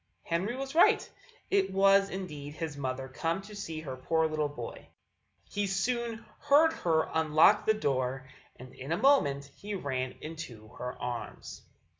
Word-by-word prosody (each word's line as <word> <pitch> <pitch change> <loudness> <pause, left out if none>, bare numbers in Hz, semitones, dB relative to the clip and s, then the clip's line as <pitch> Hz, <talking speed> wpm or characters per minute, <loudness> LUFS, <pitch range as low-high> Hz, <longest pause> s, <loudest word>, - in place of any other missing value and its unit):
Henry 185 +8 -1
was 270 +1 -5
right: 335 - +5 0.4
it 390 0 +3
was 195 +1 +5
indeed 150 -6 -6
his 160 -3 -4
mother 130 -1 -3
come 165 +7 -2
to 210 +1 -11
see 165 -6 -5
her 135 -4 -6
poor 160 +5 +1
little 155 -1 -1
boy. 120 -5 -8 0.6
He 205 0 -2
soon 230 +4 -1
heard 295 +3 +5
her 160 - +1
unlock 160 +6 +4
the 220 - +5
door, 130 -6 -1 0.3
and 125 0 -12
in 135 +4 -8
a 165 - +2
moment 180 - +3
he 205 0 -5
ran 130 -7 -2
into 145 -9 -8
her 125 +1 -7
arms. 125 -1 -6
160 Hz, 155 wpm, -30 LUFS, 135-205 Hz, 0.6 s, right